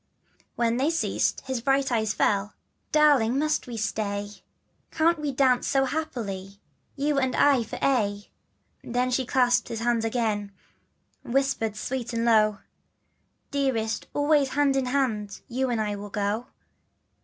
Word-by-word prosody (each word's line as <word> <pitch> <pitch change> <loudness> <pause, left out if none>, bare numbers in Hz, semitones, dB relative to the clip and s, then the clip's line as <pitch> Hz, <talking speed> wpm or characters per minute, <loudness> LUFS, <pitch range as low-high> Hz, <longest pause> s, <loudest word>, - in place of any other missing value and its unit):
When 235 0 +1
they 275 +4 +2
ceased 330 0 0
his 260 -3 -4
bright 270 +1 +1
eyes 220 -2 +1
fell, 205 -1 0 0.4
Darling 280 -6 +4
must 305 0 0
we 240 -2 -6
stay? 205 -2 -2 0.6
Can't 330 +1 +2
we 295 -1 -2
dance 260 -2 +2
so 270 -1 +2
happily 200 -10 -4 0.4
You 285 0 +1
and 260 -2 0
I 280 -3 +4
for 220 - -7
aye? 205 -6 0 0.5
Then 250 +1 -1
she 255 0 0
clasped 245 -1 +2
his 225 -1 -5
hand 235 -1 +1
again, 220 -3 -1 0.7
Whispered 260 -4 0
sweet 245 +2 -4
and 230 0 0
low, 215 -3 +3 0.4
" - - -46
Dearest, 260 -6 -1
always 290 -1 +3
hand 280 0 +2
in 265 -2 0
hand 225 -7 -1
You 260 +2 -1
and 235 -2 0
I 210 -1 -1
will 205 +1 -8
go. 205 +4 -2
245 Hz, 145 wpm, -26 LUFS, 215-275 Hz, 0.7 s, Darling